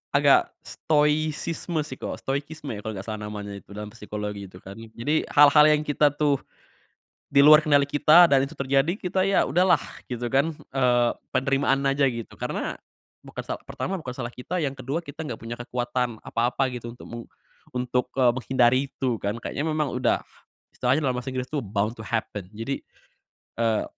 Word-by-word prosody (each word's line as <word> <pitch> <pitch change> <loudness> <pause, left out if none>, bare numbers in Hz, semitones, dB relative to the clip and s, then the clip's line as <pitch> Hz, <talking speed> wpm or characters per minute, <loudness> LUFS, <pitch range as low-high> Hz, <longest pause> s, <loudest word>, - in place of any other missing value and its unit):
agak - - +6 0.2
stoikisme 155 +2 0
sih 130 -3 -8
ko - - -5
stoikisme 140 +1 -4
ya, - - -6
kalo 110 - -3
nggak 95 -1 -6
salah, 110 -1 -4
namanya 105 -1 -6
itu, 100 - -13
dalam 105 0 -6
psikologi, 105 -1 -6
gitu 90 0 -14
kan. 100 +2 -10
Jadi, 115 +7 -2
hal-hal 150 +1 +7
yang 150 0 +3
kita 145 -1 +2
tuh, 145 -2 +1 0.9
di 140 - +7
luar 155 0 +10
kendali 145 -2 +4
kita, 155 +4 +7
dan 135 -1 +5
itu - - -11
terjadi, 140 +4 +2
kita 185 +1 -1
ya 195 - +3
udahlah, 180 +6 +4 0.3
gitu 120 -1 -3
kan. 140 +5 +2 0.2
Eee, 120 -2 +3 0.2
penerimaan 135 +1 +2
aja, 140 0 +2
gitu. 115 -2 -7
Karena, - - -3 0.5
bukan - - -7
sal - - -4
pertama, 195 - -4
bukan 125 -4 -7
salah 120 -2 -5
kita, 175 +8 -4
yang 140 -1 -2
ke-2, 135 +5 -3
kita 160 +1 -7
nggak 115 - -5
punya 115 +1 -6
kekuatan 120 -1 -2
apa-apa, 120 +3 0
gitu, 120 -1 -6
untuk - - -13
meng 120 0 -7 0.5
untuk, 125 0 0
eee, 125 -2 +5
menghindari 130 0 +2
itu, 125 -4 -2
kan. 100 +2 -2
Kayaknya 145 - -3
memang 155 -3 0
udah, 125 - +1 0.5
istilahnya 130 +5 +1
dalam 130 -3 +1
bahasa 130 - -6
Inggris 130 0 -4
tuh, 150 - 0
bound 105 +3 -1
to - - -6
happen. 105 -4 -3
Jadi, 115 +5 -3 0.8
eee, 115 -2 +2
130 Hz, 180 wpm, -25 LUFS, 115-150 Hz, 0.9 s, luar